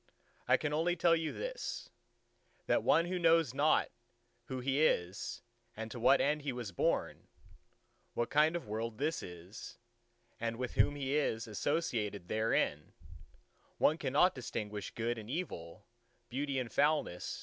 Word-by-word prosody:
"I - - +5
can 150 -1 -2
only 165 +3 +2
tell 170 -1 +4
you 160 -1 -1
this: - - -5 0.7
that - - +2
one 165 - +4
who 180 +1 -2
knows 165 -6 +4
not 145 +3 +3 0.5
who 130 +1 -4
he 135 +3 +1
is 90 - 0 0.3
and 110 0 -5
to 120 - -6
what 125 +4 +5
end 150 +1 +1
he 140 -1 -2
was 120 -5 -5
born; 85 - -1 0.9
what 120 +1 -1
kind 155 +4 +4
of 170 - -4
world 110 +1 -3
this 150 +5 -1
is 90 +4 -9 0.6
and 115 0 -2
with 125 0 -3
whom 110 +7 +3
he 140 -1 -2
is 115 -6 +1
associated 105 - -2
therein; 110 -8 0 0.8
one - - +5
who - - -10
cannot 145 +7 +3
distinguish 105 -5 -4
Good 115 +1 -2
and 110 0 -10
Evil, 100 - -5 0.4
Beauty 140 +2 -2
and 120 -4 -3
Foulness 145 - +1
130 Hz, 150 wpm, -34 LUFS, 110-150 Hz, 0.9 s, I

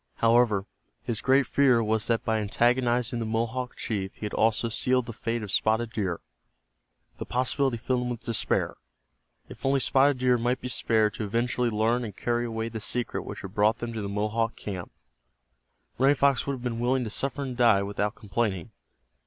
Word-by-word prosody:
However, 115 -4 +3 0.4
his 115 -3 -3
great 135 +1 +4
fear 125 -3 +3
was 110 0 +1
that 115 +1 0
by 110 -2 +1
antagonizing 120 +2 +1
the 115 - -2
Mohawk 115 +3 -2
chief 95 -4 -3
he - - -6
had 105 - -5
also 110 +1 +2
sealed 125 +2 +2
the 115 - -7
fate 115 +1 -3
of 100 - -5
Spotted 110 +2 +1
Deer. 95 -6 -2 1.0
The - - -4
possibility 130 0 0
filled 125 +2 -1
him 125 - -2
with 120 -1 -4
despair. 115 -1 -1 0.7
If - - -12
only 135 0 +2
Spotted 135 +1 +3
Deer 125 -1 +2
might 120 +2 0
be 125 - -5
spared 110 -3 +2
to - - -4
eventually 120 +3 0
learn 115 +3 +1
and 105 -4 -7
carry 120 0 0
away 115 0 -3
the 115 -1 -5
secret 120 +3 -3
which - - -7
had 95 -1 -8
brought 105 +2 +3
them 120 -1 -5
to 110 - -4
the 100 - -4
Mohawk 110 +3 -1
camp, 95 -4 -6 1.1
Running 135 +2 +5
Fox 140 -2 +2
would 140 - 0
have 125 -2 -7
been 120 -2 -2
willing 125 +2 +1
to 110 - -5
suffer 140 +4 -2
and 130 -2 -5
die 115 -5 +4
without 105 +2 -2
complaining. 100 -5 -2
115 Hz, 190 wpm, -27 LUFS, 110-125 Hz, 1.1 s, Running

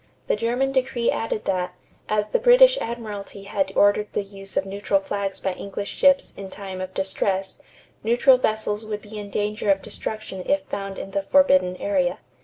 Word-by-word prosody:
The - - +1
German 240 +5 0
decree 255 -3 +1
added 225 -1 -2
that, 180 -1 -1 0.3
as 210 0 +1
the - - +2
British - - +7
admiralty 210 -4 -6
had 195 -1 -1
ordered 205 +1 +4
the 205 - 0
use 195 0 -9
of 190 - +2
neutral 200 0 0
flags 195 0 -3
by 190 - -1
English 200 +2 -5
ships 275 -1 +3
in 195 -1 -8
time 190 -1 -7
of 185 0 -6
distress, 190 0 -1 0.4
neutral 245 +3 +5
vessels 215 -2 -1
would 210 -1 -5
be 215 0 -8
in 205 -1 -7
danger 210 +1 -2
of 195 -1 +3
destruction 215 -3 -5
if 290 0 +2
found 195 -6 -5
in 195 - -6
the 200 - 0
forbidden 185 -7 +4
area. 185 -3 0
205 Hz, 180 wpm, -24 LUFS, 195-225 Hz, 0.4 s, British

